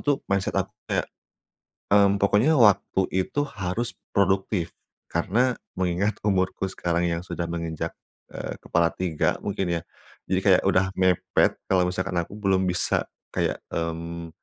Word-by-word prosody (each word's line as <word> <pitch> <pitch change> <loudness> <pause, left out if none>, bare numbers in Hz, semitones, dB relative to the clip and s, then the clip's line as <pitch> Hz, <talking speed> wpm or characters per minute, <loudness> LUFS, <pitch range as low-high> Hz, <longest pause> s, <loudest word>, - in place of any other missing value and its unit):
tuh, 145 -2 +2
mindset 100 -1 0
aku - - 0 0.2
kayak, - - 0 0.8
mmm, 100 -1 +5
pokoknya 105 +10 +4
waktu 100 -3 +4
itu, 95 +10 0
harus 100 +3 -3 0.2
produktif, 95 -2 +1 0.3
karena 115 +9 +1 0.2
mengingat 95 +3 0
umurku 95 0 +1
sekarang 85 -2 -1
yang 85 0 -2
sudah 85 -2 -4
menginjak, 85 -2 -4 0.4
eee, - - -5
kepala 85 0 +1
3 85 -4 0
mungkin 90 -4 -1
ya. - - -11 0.5
Jadi - - +1
kayak, - - +5
sudah 95 0 +3
mepet, 95 -2 +3 0.2
kalau 90 -1 +4
misalkan 90 0 -2
aku 85 +4 -5
belum 95 -3 +1
bisa 90 0 +1 0.2
kayak, - - -1
mmm, 85 0 -4
95 Hz, 135 wpm, -25 LUFS, 85-100 Hz, 0.8 s, mmm